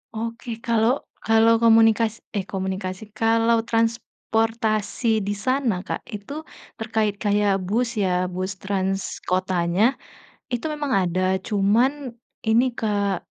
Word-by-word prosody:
Oke, 230 +2 -5
kalau 235 +3 +2 0.2
kalau 225 +1 +5
komunikasi 225 -1 +4 0.2
eh, 190 - -2
komunikasi, 190 0 -4 0.2
kalau 230 +1 +3
transportasi 225 -1 0
di 205 - 0
sana, 235 -4 0
Kak, - - -3 0.2
itu 205 +7 -8 0.5
terkait 215 -2 -1
kayak 205 -1 +2
bus 230 +5 +1
ya, 180 -2 +1
bus 185 +2 -3
trans 195 0 -2
kotanya, 185 +1 +1 0.7
itu 245 - -2
memang 295 -2 -3
ada, 175 +1 -1 0.3
cuman 215 +5 +3 0.6
ini, 230 +3 +5
Kak, 205 -5 -1
220 Hz, 110 wpm, -23 LUFS, 195-230 Hz, 0.7 s, kalau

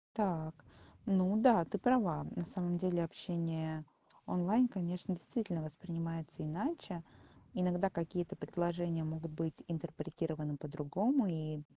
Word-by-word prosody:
Так. 165 -7 +1 0.5
Ну 190 -1 +4
да, 225 -7 +7
ты 205 - -2
права. 195 -9 +3
На 175 - -1
самом 175 -1 -1
деле 175 -2 +2
общение 160 -2 -2 0.4
онлайн, 205 +8 +4
конечно, 180 -1 -2
действительно 180 -1 -2
воспринимается 165 0 -4
иначе. 180 - -3 0.5
Иногда 180 +1 +2
какие-то 170 0 -2
предложения 175 -1 0
могут 160 0 -3
быть 160 -1 -3
интерпретированы 160 -2 -3
по-другому, 175 - +2
и, 155 -3 -2
170 Hz, 110 wpm, -36 LUFS, 160-185 Hz, 0.5 s, да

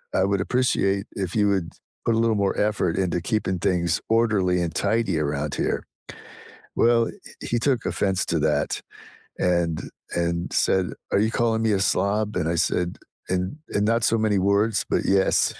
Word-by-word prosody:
"I 95 - +3
would 100 -1 +1
appreciate 100 -4 +1
if 95 -2 -3
you 105 -1 +3
would 95 -4 0 0.4
put 115 - +2
a - - +1
little 115 -1 +2
more 95 - 0
effort 105 -5 0
into 90 -2 0
keeping 95 -3 -1
things 85 -2 0
orderly 105 -6 +2
and 85 -2 -2
tidy 110 -8 0
around 75 0 -2
here." - - -1 0.9
Well, 115 -1 +4
h - - -13 0.2
he 120 - +2
took 125 -1 0
offense 95 -2 0
to - - 0
that - - 0 0.6
and 85 -3 +1 0.3
and 85 0 -1
said, 95 -1 +2 0.3
"Are - - +4
you 110 +2 +2
calling 115 -1 +1
me 110 -2 +2
a 95 - +1
slob?" 105 +2 0
And 80 -3 0
I 85 - 0
said, 90 +2 0 0.3
"In 95 +10 -2
in 105 - 0
not 115 +1 +2
so 115 - +3
many 105 -2 +2
words, 100 +3 +2
but, - - +1
yes," 95 -1 +2
100 Hz, 175 wpm, -24 LUFS, 90-110 Hz, 0.9 s, Well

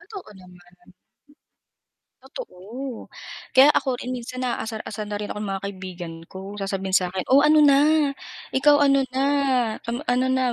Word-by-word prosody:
Totoo 380 - -11
naman. 185 -1 -16 1.7
Totoo 260 - -8 0.5
kaya 265 - +9
ako 260 -3 0
rin 255 - -5
minsan 255 +1 -6
naasar-asar 220 -3 -4
na 205 - -2
rin 210 - -4
ako 210 - -7
ng 205 - -4
mga 195 0 -4
kaibigan 185 -3 -7 0.2
ko. 190 +1 -8
Sasabihin 195 -1 -3
sa 185 -1 +3
'kin, 185 0 -4
"O, 275 - +7
ano 305 +1 +5
na, 280 -1 +6 0.7
ikaw 290 +2 +5
ano 275 0 +4
na, 265 +1 0 0.6
kam 235 +1 -4
ano 250 +1 +1
na 260 -2 +1
235 Hz, 155 wpm, -23 LUFS, 195-265 Hz, 1.7 s, kaya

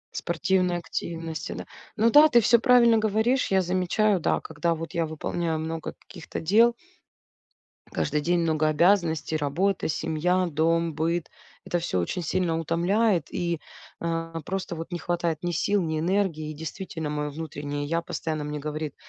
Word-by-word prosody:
Спортивной 180 +1 +1
активности, 165 -2 -5
да. - - -6 0.3
Ну 225 +1 +4
да, 300 +1 +9
ты 240 -5 +5
всё 235 +1 +5
правильно 235 -3 +5
говоришь, 220 +3 +1
я 190 -1 +4
замечаю, 185 +3 +1
да, - - +1
когда 160 +2 -1
вот 165 +1 -7
я 170 -1 0
выполняю 160 +1 -2
много 160 0 -4
каких-то 175 -5 -8
дел 230 +8 +4 1.2
каждый 150 +1 0
день 175 +2 +1
много 155 -2 +1
обязанностей: 160 -2 +2
работа, 165 +6 0
семья, 180 +4 0
дом, 165 +1 +1
быт. 165 +1 -1 0.4
Это 175 - 0
всё 95 - -1
очень 170 - -2
сильно 165 0 0
утомляет 175 +3 +1
и, 170 -2 -1 0.4
э, 165 0 -2
просто 185 -2 -3
вот 165 +2 -7
не 175 - -3
хватает 170 -2 -2
ни 175 - 0
сил, 200 +4 +1
ни 160 -1 -1
энергии. 170 -3 0
И - - -5
действительно, 160 0 -5
мое 150 0 -2
внутреннее 145 -1 -5
"я" 165 +3 0
постоянно 155 -2 -4
мне 150 0 -4
говорит: 150 0 -4
170 Hz, 155 wpm, -26 LUFS, 155-185 Hz, 1.2 s, да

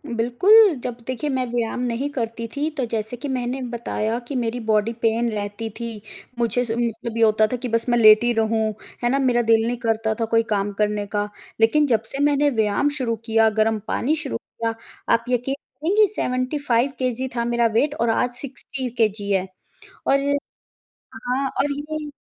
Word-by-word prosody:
बिल्कुल, 365 - +5
जब 245 -2 -4
देखिए 260 +4 -2
मैं 260 -2 0
व्यायाम 240 0 -1
नहीं 250 +3 -1
करती 230 -2 -3
थी, 295 +2 0
तो 275 -5 -2
जैसे 225 +1 -3
कि 285 - -5
मैंने 255 0 -2
बताया 235 -1 -2
कि 285 - -5
मेरी 245 -1 -1
बॉडी 215 +1 +2
पेन 230 +1 +2
रहती 205 +1 -4
थी, 230 -3 -5 0.4
मुझे 235 +1 +1
स 225 - -4
उ - - -1
मतलब 230 0 -3
ये 230 - +3
होता 215 0 +4
था - - 0
कि 250 - -5
बस 230 +1 0
मैं 240 - +3
लेटी 220 +1 +7
रहूँ, 220 -1 +1 0.3
है 240 - +3
ना, 275 - +2
मेरा 250 -3 +3
दिल 225 -1 +3
नहीं 245 - -1
करता 225 -2 0
था 225 - +1
कोई 225 0 +2
काम 205 -1 0
करने 210 0 0
का, 205 0 -1 0.3
लेकिन 290 +7 +4
जब 225 -4 +2
से 275 - -4
मैंने 290 0 +3
व्यायाम 220 +2 +1
शुरू 235 -4 -1
किया, 225 -1 +4
गर्म 220 0 +1
पानी 300 +6 0
शुरू 290 -6 -3
किया, 230 -1 -4 0.4
आप 230 0 +1
यकीन 250 +2 0
करेंगी 385 +9 +1
75 255 - 0
KG 255 +1 -1
था 235 -1 0
मेरा 235 0 +1
वेट 285 +6 +2
और 230 0 0
आज 245 +2 +1
60KG 240 -5 -2
है 190 -1 +1 0.6
और 275 0 +4 0.9
हाँ 265 +2 -1
और 285 +1 +1
ये 300 +1 -5
235 Hz, 185 wpm, -22 LUFS, 225-260 Hz, 0.9 s, लेटी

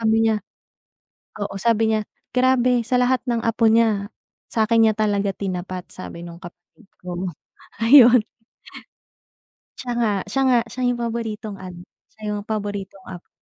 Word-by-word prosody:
sabi 225 0 +3
niya 215 -1 +1 1.0
oo, 200 - -4
sabi 225 +1 +2
niya, 215 - +1 0.3
"Grabe, 250 -1 +3
sa 250 +2 +1
lahat 250 0 +2
ng 235 -1 0
apo 230 0 +1
niya, 220 -3 +2 0.4
sa'kin 225 0 +3
niya 220 - +3
talaga 205 -2 +1
tinapat." 185 -2 -5
sabi 175 -2 -9
nung 170 -1 -10
kapatid 175 +5 -15 0.2
ko, 180 +1 -4 0.6
ayon. 250 -1 +8 1.6
Siya 245 -1 -5
nga, 220 -3 +2 0.2
siya 270 - 0
nga, 245 - +5
siya 255 - -5
yung 245 - 0
paboritong 225 -3 -4
ano, 180 -1 -9 0.3
siya 215 -1 -6
yung 205 - -4
paboritong 205 -2 -4
apo. 180 -2 -10
220 Hz, 145 wpm, -22 LUFS, 195-235 Hz, 1.6 s, ayon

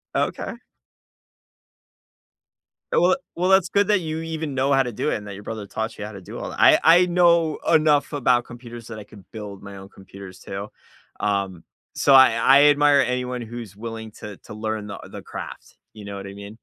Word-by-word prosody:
Okay. - - -2 2.4
Well 180 +1 +4 0.2
well, 180 +2 0
that's 190 -3 +4
good 200 0 +2
that 210 -2 +3
you 160 -1 -4
even 160 -2 -4
know 135 +1 0
how 135 0 +4
to 125 - -5
do - - -2
it - - 0
and 105 - -6
that 100 - -7
your 100 - -10
brother 110 -1 -6
taught 110 +3 -5
you 105 - -6
how 105 - -7
to 100 -2 -10
do - - -10
all - - -5
that. - - -9
I - - +6
I 175 +2 +6
know 170 -3 +3
enough 155 -2 +3
about 125 -3 +2
computers 120 -1 -11
that 110 -2 -8
I - - -9
could 100 -1 -16
build 105 -3 -9
my 100 -1 -10
own 95 0 -12
computers 95 -1 -13
too, 100 +1 -7 0.5
um, 100 -4 -2 0.3
so 140 - +3
I 130 -3 +8
I 135 +5 +5
admire 145 -1 +5
anyone 125 -1 -1
who's 115 -4 -8
willing 110 0 -7
to 105 -2 -9
to - - -13
learn 110 0 -4
the 100 - -7
u - - -12
the - - -9
craft, - - -9 0.2
you 105 -2 -11
know 100 - -7
what 100 0 -7
I 100 - -9
mean? 100 +2 -11
115 Hz, 210 wpm, -23 LUFS, 100-145 Hz, 2.4 s, I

